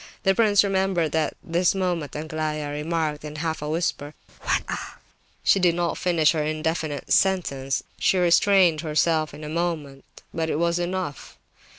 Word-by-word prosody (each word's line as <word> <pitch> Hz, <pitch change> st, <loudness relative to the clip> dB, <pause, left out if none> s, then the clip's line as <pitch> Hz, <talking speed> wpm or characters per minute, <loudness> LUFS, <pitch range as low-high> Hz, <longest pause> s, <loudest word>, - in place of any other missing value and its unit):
The 195 Hz, -, +4 dB
prince 205 Hz, -1 st, +4 dB
remembered 190 Hz, -5 st, 0 dB
that 155 Hz, -1 st, 0 dB
at -, -, -37 dB
this 175 Hz, +3 st, +1 dB
moment 175 Hz, -6 st, -2 dB
Aglaya 155 Hz, -1 st, -3 dB
remarked 150 Hz, 0 st, -2 dB
in 150 Hz, 0 st, -7 dB
a -, -, -6 dB
half 160 Hz, -2 st, -2 dB
whisper: 150 Hz, -1 st, -2 dB, 0.3 s
"What -, -, 0 dB
a—" -, -, -6 dB, 0.5 s
She 195 Hz, -, +4 dB
did 175 Hz, -2 st, +3 dB
not 175 Hz, -1 st, -1 dB
finish 170 Hz, -4 st, +2 dB
her 155 Hz, -2 st, -1 dB
indefinite 155 Hz, -1 st, -2 dB
sentence; 140 Hz, -9 st, +1 dB, 0.2 s
she 190 Hz, -, +2 dB
restrained 180 Hz, -2 st, +4 dB
herself 155 Hz, 0 st, +1 dB
in 150 Hz, +2 st, -10 dB
a -, -, -5 dB
moment; 155 Hz, -4 st, -3 dB, 0.3 s
but 160 Hz, -1 st, -2 dB
it -, -, 0 dB
was 170 Hz, +1 st, +1 dB
enough. 175 Hz, -4 st, -4 dB
160 Hz, 165 wpm, -24 LUFS, 150-175 Hz, 0.5 s, The